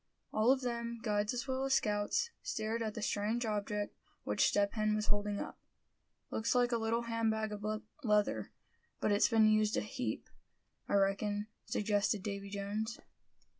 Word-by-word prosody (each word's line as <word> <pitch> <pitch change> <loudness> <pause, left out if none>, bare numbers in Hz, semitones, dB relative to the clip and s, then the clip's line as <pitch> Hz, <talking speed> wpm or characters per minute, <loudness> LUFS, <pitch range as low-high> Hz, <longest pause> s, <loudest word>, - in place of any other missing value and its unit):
All 215 +4 +5
of 265 0 +3
them, 235 -1 -2
guides 210 -1 +1
as 245 +1 -3
well 260 0 -1
as 270 0 +3
scouts, 210 - +1
stared 220 +1 -2
at 220 -2 -2
the 220 - -4
strange 220 +3 0
object 210 -1 -2 0.3
which - - +3
Step 200 -1 +2
Hen 215 -1 +1
was 215 0 0
holding 205 -1 0
up. - - -6 0.7
"Looks 220 +3 0
like 245 0 +4
a 235 - +3
little 225 +1 0
hand 230 -1 0
bag 220 0 -1
of 210 -1 -6 0.4
leather; 210 -3 +2 0.5
but - - +1
it's 205 - +4
been 220 -1 +5
used 215 0 +3
a - - +2
heap, 255 +4 -3 0.6
I - - +2
reckon," 205 +1 +1 0.2
suggested 205 -1 +1
Davy 200 -1 -4
Jones. 205 +3 -3
215 Hz, 170 wpm, -34 LUFS, 205-230 Hz, 0.7 s, All